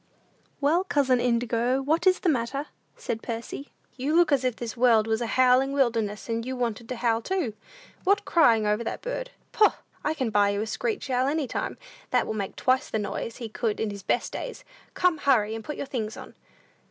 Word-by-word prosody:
"Well, 315 +6 +3
cousin 275 -8 +2
Indigo, 240 +1 +1
what 310 +7 +1
is 370 0 +4
the - - 0
matter?" 275 0 0 0.3
said 225 - -4
Percy; 235 +4 -6 0.3
"you 280 +5 0
look 345 -2 +5
as 275 -2 +3
if 250 -2 0
this 235 0 -5
world 230 -3 +4
was 220 +1 0
a 235 - -1
howling 255 +3 +4
wilderness, 230 -6 0
and 230 0 -1
you 260 +2 -4
wanted 235 -2 -3
to 255 - -2
howl 230 -1 +1
too. 335 - -1 0.5
What, 400 +1 +2
crying 230 -10 +4
over 210 +2 +1
that - - -5
bird? - - -4 0.2
Poh! 425 - +4 0.3
I 305 +1 0
can 255 -7 -1
buy 205 -1 +4
you 200 0 -1
a - - -3
screech 430 - -2
owl 255 +1 +2
any 300 +1 0
time, - - -3 0.3
that - - +2
will - - -3
make 200 -3 -4
twice 260 +2 +1
the - - -1
noise 210 +2 -4
he 235 - -5
could 220 0 -2
in 220 -2 -1
his 200 -1 -7
best 220 - 0
days. - - -6 0.3
Come, 355 -4 +2
hurry, 225 -7 +3
and 225 0 -5
put 300 - -5
your - - -3
things 225 -5 -4
on!" - - -10
245 Hz, 210 wpm, -26 LUFS, 225-285 Hz, 0.5 s, look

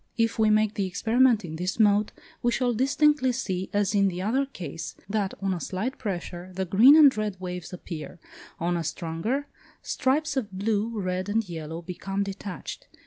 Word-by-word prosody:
If 230 -1 +1
we 220 -1 +4
make 215 0 +3
the 200 -4 -1
experiment 225 +3 +3
in 160 -1 -6
this 180 +5 -3
mode, 210 -1 +4 0.3
we 240 - +2
shall 245 0 +1
distinctly 275 +2 +3
see, 190 -7 -3
as 205 -1 +1
in 200 -1 +4
the 180 -2 -3
other 250 +8 0
case, 170 - -7
that, 200 -1 -1
on 195 -1 +1
a 180 - -3
slight 215 +8 -3
pressure, 180 -4 -5
the 190 0 -1
green 220 - +7
and 295 -4 +7
red 210 -3 -3
waves 180 -2 -6
appear; 175 -1 -7 0.4
on 175 +1 0
a 170 - -1
stronger, 170 - -2 0.4
stripes 295 +3 0
of 230 -7 -2
blue, 210 +3 -1
red, 185 0 -2
and 220 0 0
yellow, 165 0 -6
become 195 +3 -3
detached. 195 -1 -7
200 Hz, 180 wpm, -26 LUFS, 180-230 Hz, 0.4 s, green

